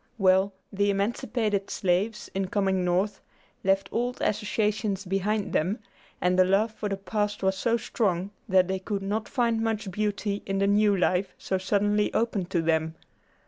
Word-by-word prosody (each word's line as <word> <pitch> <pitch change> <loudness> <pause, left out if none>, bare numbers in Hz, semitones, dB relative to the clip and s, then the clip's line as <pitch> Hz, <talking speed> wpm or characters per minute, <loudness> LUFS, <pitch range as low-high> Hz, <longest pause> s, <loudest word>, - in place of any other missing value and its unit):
Well, 190 0 +4 0.2
the 200 +1 +2
emancipated 205 0 -1
slaves, 195 +4 0
in 195 0 -1
coming 190 -1 +1
North, 190 +3 0 0.4
left 195 0 +2
old 245 +2 -1
associations 210 -1 0
behind 195 +3 -1
them, 185 +8 +1 0.4
and 180 +1 +2
the - - +8
love 200 +4 +2
for 210 -1 -4
the 195 - -2
past 205 +1 -2
was 190 0 +2
so 230 +4 +1
strong 195 -5 -1 0.2
that 185 -1 +4
they 190 0 -1
could 195 +1 -3
not 210 +3 -2
find 235 -3 +1
much 220 -3 -1
beauty 205 0 -1
in 195 0 -1
the 195 - +2
new 205 0 +4
life 180 +1 +1
so 190 - -2
suddenly 205 +2 +1
opened 215 -6 0
to 170 -2 0
them. 160 0 +1
200 Hz, 165 wpm, -27 LUFS, 190-210 Hz, 0.4 s, the